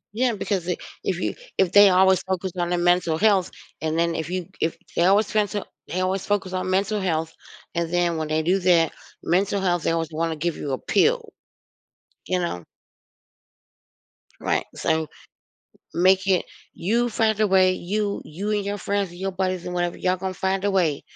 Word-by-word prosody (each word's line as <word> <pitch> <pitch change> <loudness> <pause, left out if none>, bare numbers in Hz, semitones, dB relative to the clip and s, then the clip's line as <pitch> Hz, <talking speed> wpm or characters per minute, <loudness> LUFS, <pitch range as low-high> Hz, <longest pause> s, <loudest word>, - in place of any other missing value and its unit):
Yeah, 245 +1 +2
because 195 -3 -2
i 180 - 0 0.3
if - - -1
you - - -1 0.2
if 190 -3 +3
they 205 +1 +8
always 190 0 +4
focus 190 0 -3
on 175 -1 -1
their 175 - +1
mental 175 -2 +2
health 195 -2 +3 0.3
and, 160 0 -1
then, 170 0 +2
if 160 -1 -4
you 180 -1 -3
if 160 - 0 0.2
they 170 - +3
always 200 +3 +4
trying 210 -1 +2
to 205 -2 -4 0.2
they 185 +2 -2
always 190 +1 0
focus 195 -2 -1
on 185 0 -2
mental 200 +2 +1
health 160 -3 -1 0.4
and 170 -1 -2
then 175 -1 +1
when 155 -1 -2
they 155 +1 0
do 185 +4 +2
that 175 -3 +3 0.3
mental 195 +4 +1
health, 175 -3 0
they - - +1
always 165 -1 -1
wanna 165 +1 -1
give 170 +1 -2
you 145 - -4
a 130 - 0
pill. 455 - +1 0.9
You 185 0 0
know? 90 - -3 1.8
Right, - - 0
so, 160 0 0 0.9
make 190 +2 +3
it 190 -2 +2 0.3
you 235 +7 0
find 220 -2 +1
a 215 - +4
way. 185 -1 +4
You 200 +3 -2
you 185 +8 -5
and 205 -1 0
your 205 +1 -3
friends 200 -2 -1
and 175 - -12
your 195 +1 -2
buddies 185 -1 -2
and 180 - -4
whatever, 175 -1 -1
y'all 185 0 +1
gonna 190 +1 -4
find 190 +1 -1
a 205 - +2
way 170 -7 +1
185 Hz, 195 wpm, -24 LUFS, 170-195 Hz, 1.8 s, they